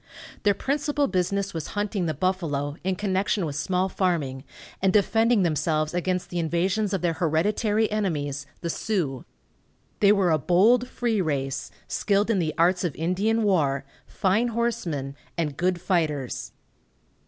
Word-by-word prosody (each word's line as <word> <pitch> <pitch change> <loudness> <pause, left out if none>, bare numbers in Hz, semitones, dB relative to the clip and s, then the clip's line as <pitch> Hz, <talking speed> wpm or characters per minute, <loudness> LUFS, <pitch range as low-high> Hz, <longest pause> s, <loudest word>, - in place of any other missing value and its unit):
Their 205 -1 +3
principal 290 +3 0
business 195 +1 -1
was 160 -2 -4
hunting 205 -3 -1
the 155 - -1
buffalo, 150 -5 -1
in 190 0 0
connection 195 -1 0
with 145 -3 -4
small 180 +5 0
farming, 160 -9 -1 0.4
and 190 0 +3
defending 225 +2 +3
themselves 155 -1 0
against 180 0 -1
the 175 - -2
invasions 185 +5 0
of 190 -2 -2
their 170 -1 +2
hereditary 205 +7 +1
enemies, 150 -9 -2
the 170 - -3
Sioux. 160 - -2 0.7
They 200 -1 +6
were 195 -4 +3
a 155 - +3
bold, 220 - +4
free 230 -5 0
race, 135 -5 -2 0.2
skilled 205 +2 +1
in 205 - +2
the 155 -3 -1
arts 180 +2 +3
of 170 -5 -2
Indian 200 +7 +1
war, 145 -9 +1 0.2
fine 205 +5 +1
horsemen, 220 - -2 0.2
and 150 -4 -1
good 180 +2 0
fighters. 160 -8 -1
180 Hz, 145 wpm, -25 LUFS, 155-205 Hz, 0.7 s, They